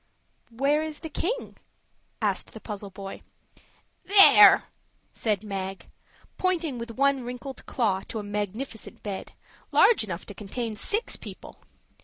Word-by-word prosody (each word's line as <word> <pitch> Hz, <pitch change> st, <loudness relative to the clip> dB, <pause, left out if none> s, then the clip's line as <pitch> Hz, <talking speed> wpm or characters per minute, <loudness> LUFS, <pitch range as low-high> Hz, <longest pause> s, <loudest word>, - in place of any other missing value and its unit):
"Where 275 Hz, +6 st, +1 dB
is 310 Hz, -1 st, -5 dB
the 320 Hz, -, -6 dB
King?" 470 Hz, +12 st, -3 dB, 0.7 s
asked -, -, -1 dB
the -, -, -9 dB
puzzled 200 Hz, -3 st, -8 dB
boy. 195 Hz, -1 st, -8 dB, 0.8 s
"There," 395 Hz, 0 st, +9 dB, 0.5 s
said 210 Hz, -3 st, -1 dB
Mag, 195 Hz, -2 st, -5 dB, 0.5 s
pointing 335 Hz, -8 st, 0 dB
with 235 Hz, +1 st, -6 dB
one 275 Hz, +2 st, +1 dB
wrinkled 250 Hz, +2 st, -7 dB
claw 205 Hz, -7 st, 0 dB
to -, -, -6 dB
a 210 Hz, -, -4 dB
magnificent 210 Hz, +4 st, -5 dB
bed, 200 Hz, -2 st, -6 dB, 0.4 s
large 470 Hz, -, +5 dB
enough 185 Hz, -4 st, -6 dB
to -, -, -9 dB
contain 220 Hz, +3 st, -5 dB
six 425 Hz, -, -1 dB
people. -, -, -11 dB
230 Hz, 130 wpm, -26 LUFS, 205-280 Hz, 0.8 s, There